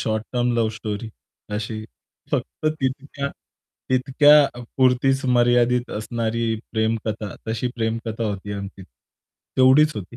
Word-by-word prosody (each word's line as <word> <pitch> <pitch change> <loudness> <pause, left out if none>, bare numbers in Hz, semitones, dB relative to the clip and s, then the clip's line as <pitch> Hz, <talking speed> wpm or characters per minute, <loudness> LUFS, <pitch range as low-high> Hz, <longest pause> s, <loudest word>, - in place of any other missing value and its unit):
Short 110 0 -1
term 125 0 +1
love 115 -2 +2
story, 110 0 -5 0.4
अशी 110 +1 -4 0.5
फक्त - - -2
तितक्या 140 +1 -2 0.6
तितक्यापुरतीच 135 -1 +3
मर्यादित 120 0 +3
असणारी 115 +1 -1 0.2
प्रेमकथा. 110 -2 -1
तशी 115 +2 -1
प्रेमकथा 115 0 -2
होती 105 -1 -4
आमची. 100 -1 -7
तेवढीच 130 - +1
होती. 105 +4 -7
115 Hz, 100 wpm, -23 LUFS, 110-130 Hz, 0.6 s, तितक्यापुरतीच